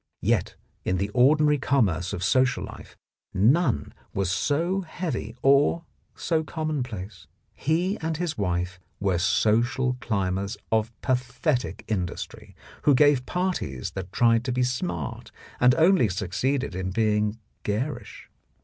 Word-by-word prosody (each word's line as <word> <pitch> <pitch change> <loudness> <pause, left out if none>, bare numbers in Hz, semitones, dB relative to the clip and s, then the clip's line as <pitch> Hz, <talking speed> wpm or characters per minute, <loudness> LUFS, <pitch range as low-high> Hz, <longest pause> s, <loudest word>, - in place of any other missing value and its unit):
Yet - - +1 0.3
in 95 - 0
the 100 +2 -1
ordinary 150 +5 +4
commerce 95 - +1
of 95 -3 -4
social 130 +5 +2
life - - -10 0.4
none 110 - +2 0.2
was 95 -2 0
so 165 - 0
heavy 160 - -4
or 140 +5 +4 0.3
so 160 -2 0
commonplace. 125 - -4 0.3
He 175 +7 0
and 160 -1 -2
his 170 -2 -2
wife 90 -2 -2 0.2
were 95 -4 +1
social 120 +6 +2
climbers 100 0 -1
of 110 0 +1
pathetic 125 +2 -1
industry, 90 -5 -4 0.3
who 145 - +4
gave 145 -2 +4
parties 180 - -2
that 95 0 -6
tried 115 +1 +3
to 130 - -1
be 125 +1 +1
smart 90 - -3 0.3
and 125 +1 +5
only 165 - +4
succeeded 110 +8 -1
in 95 +1 -3
being 105 +1 +1 0.2
garish. 120 +5 -4
125 Hz, 125 wpm, -26 LUFS, 100-145 Hz, 0.4 s, and